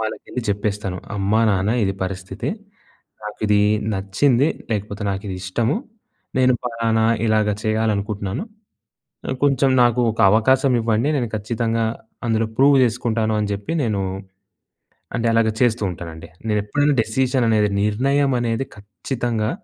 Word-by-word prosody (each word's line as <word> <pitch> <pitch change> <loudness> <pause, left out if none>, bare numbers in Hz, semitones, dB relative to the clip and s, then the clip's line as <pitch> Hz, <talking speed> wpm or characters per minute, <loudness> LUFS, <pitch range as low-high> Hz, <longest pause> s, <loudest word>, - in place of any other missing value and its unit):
వాళ్ళకెళ్లి 110 +3 -4
చెప్పేస్తాను. 100 -2 -2 0.2
అమ్మా-నాన్న 100 0 +2
ఇది 95 0 -1
పరిస్థితి. 95 +1 -5 0.8
నాకు 105 0 -7
ఇది 105 0 +4 0.3
నచ్చింది 115 +8 +2 0.2
లేకపోతే 105 0 -3
నాకు 95 0 -4
ఇది 95 - -4
ఇష్టము. 110 - 0 0.6
నేను 130 -1 +4
ఫలానా 115 -2 0 0.2
ఇలాగ 110 -1 +2
చేయాలనుకుంటున్నాను. 105 - -1 1.0
కొంచెం 140 -1 +3
నాకు 120 0 +3
ఒక 110 - -5
అవకాశం 130 +5 +3
ఇవ్వండి. 115 +3 +1
నేను 120 -4 -1
ఖచ్చితంగా 115 +2 -1 0.4
అందులో 115 -1 +1
ప్రూవ్ 140 +1 +5
జేసుకుంటాను 115 -2 0
అని 105 - -1
జెప్పి 100 +9 -4
నేను 105 -5 0 1.2
అంటే 115 - 0
అలాగా 115 -1 +3
చేస్తూ 120 -3 +2
ఉంటానండి. 80 -1 -9 0.2
నేను 105 -1 +1
ఎప్పుడైనా 145 +7 +1
డెసిషన్ 125 +3 0
అనేది 105 -2 +3
నిర్ణయం 135 +7 +1
అనేది 120 +2 -1
ఖచ్చితంగా 110 +2 -3
110 Hz, 120 wpm, -21 LUFS, 105-120 Hz, 1.2 s, ప్రూవ్